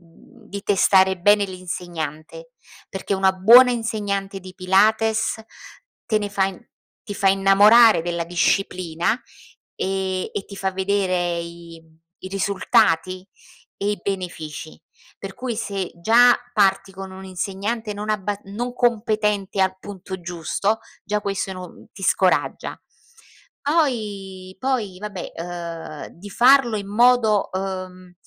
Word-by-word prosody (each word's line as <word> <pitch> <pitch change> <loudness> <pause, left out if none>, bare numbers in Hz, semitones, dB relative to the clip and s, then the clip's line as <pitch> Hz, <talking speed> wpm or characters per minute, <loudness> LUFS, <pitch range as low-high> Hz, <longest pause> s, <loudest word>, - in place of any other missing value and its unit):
mhmm, 165 -1 -21
di 200 0 -6
testare 190 -1 +4
bene 205 +3 +4
l'insegnante, 175 - -7 0.4
perché, 195 +1 -3
una 190 0 +3
buona 235 +7 +7
insegnante 205 -4 -3
di 185 0 -12
Pilates, 220 +4 +2 0.6
te 215 - +2
ne 205 -1 -3
fa 200 -1 +1
in 195 +4 -8 0.4
ti 205 - -6
fa 195 0 +2
innamorare 200 +3 +6
della 170 0 -3
disciplina, 175 -1 0 0.6
ehm, 190 -1 -2
e 195 - -4
ti 200 - -10
fa 190 0 -2
vedere 185 -3 0
i 170 -1 -10
mhmm, 160 0 -27 0.3
i - - -5
risultati 185 -2 +1 0.5
e 200 +1 -1
i 205 -3 -3
benefici, 170 -5 -6 0.4
per 195 -1 -8
cui, 245 +1 -4
se 200 -4 -3
già, 235 +7 +5 0.2
parti 195 -2 +2
con 190 0 -8
un'insegnante 195 +4 -4
non 210 +1 -6
abba 205 -1 -1
non 230 +5 -5
competente 215 -5 0
al 190 0 +1
punto 190 -1 -8
giusto, 175 +5 -2 0.3
già 210 +1 -1
questo 195 -1 -3
è - - -4
no 185 -1 -11
ti 195 - -12
scoraggia. 185 -1 +1 0.8
Poi 205 - -2
poi 225 -7 -2
vabbè, 200 -3 -7
ehm, 170 -3 -7
di 200 +4 -12
farlo 245 0 +5
in 200 -1 -5
modo, 225 -1 +3
ehm, 185 -1 -5
195 Hz, 130 wpm, -22 LUFS, 185-210 Hz, 0.8 s, buona